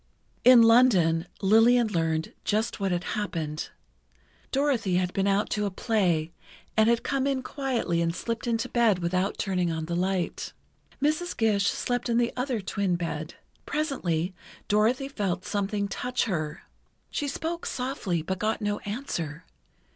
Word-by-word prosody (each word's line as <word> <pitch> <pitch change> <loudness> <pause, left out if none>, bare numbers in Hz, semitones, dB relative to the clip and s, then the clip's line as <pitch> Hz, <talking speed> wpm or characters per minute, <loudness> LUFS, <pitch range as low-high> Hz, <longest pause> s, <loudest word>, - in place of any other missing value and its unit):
In 250 -2 +8
London, 190 -9 +5 0.2
Lillian 225 +4 +5
learned 160 -4 -1
just 215 +2 0
what 195 -1 0
had 175 0 -1
happened: 165 -7 -3 0.8
Dorothy 265 -9 +1
had 180 0 0
been 195 0 +1
out 200 +1 +1
to 210 -1 0
a - - -1
play, 180 -6 0 0.4
and 220 +1 +4
had 235 0 +2
come 275 0 0
in 270 -2 0
quietly 250 -12 -1
and 165 0 0
slipped 230 +3 -3
into 230 +1 0
bed 235 -6 +3
without 180 +3 -1
turning 180 -3 0
on 160 -1 -3
the 170 +1 -3
light. 185 0 -1 0.5
Mrs. 310 +4 0
Gish 205 -3 +2
slept 245 0 -1
in 230 - +2
the 240 0 +1
other 250 -3 -1
twin 195 -1 -1
bed. 160 -2 -4 0.3
Presently, 190 - -1 0.3
Dorothy 225 +6 +2
felt 200 -8 -2
something 200 0 -1
touch 250 +5 -1
her. 155 -7 -3 0.5
She 290 - -2
spoke 330 +4 -3
softly, 225 - -2
but 190 +3 -3
got 215 +2 0
no 205 0 -1
answer. 180 - -5
205 Hz, 150 wpm, -27 LUFS, 175-245 Hz, 0.8 s, In